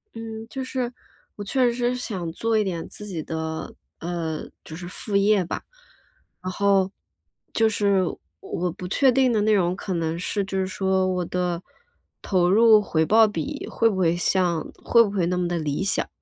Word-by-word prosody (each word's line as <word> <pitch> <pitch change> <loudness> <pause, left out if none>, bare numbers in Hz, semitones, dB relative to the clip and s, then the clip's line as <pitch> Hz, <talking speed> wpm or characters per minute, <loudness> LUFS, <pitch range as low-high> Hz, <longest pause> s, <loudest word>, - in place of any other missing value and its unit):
嗯， 225 0 -7
就 265 +4 -4
是 255 -2 -2 0.4
我 205 - -6
确 245 +4 +2
实 245 +1 0
想 190 -9 -4
做 225 +6 0
一 215 - +3
点 175 -4 -3
自 210 - -8
己 180 -6 -4
的， 160 0 -5 0.2
呃， 165 -2 -4
就 160 - -9
是 175 +1 -7
副 200 +3 -5
业 200 -1 +4
吧。 - - -4 0.8
然 185 0 -4
后 195 0 +2 0.6
就 225 -1 +3
是 200 -2 +2
我 175 - -4 0.2
我 180 - -3
不 180 +2 -7
确 265 +8 +4
定 260 0 +3
的 220 -3 +2
内 215 +1 +3
容 180 -3 +2
可 190 0 -4
能 165 -1 -1
是 200 +3 -1
就 195 0 -3
是 190 - +1
说 190 0 +1
我 180 -1 -1
的 180 -1 -2 0.6
投 180 -3 +2
入 220 +2 +6
回 160 -5 +1
报 220 +5 +6
比 170 -7 -4
会 230 - +2
不 200 - -2
会 170 -2 +3
像 175 -2 +1 0.2
会 235 -1 +6
不 205 - -2
会 190 -4 0
那 180 0 0
么 180 -1 0
地 175 0 -1
理 150 +3 -2
想。 195 - 0
190 Hz, 205 characters per minute, -24 LUFS, 175-220 Hz, 0.8 s, 入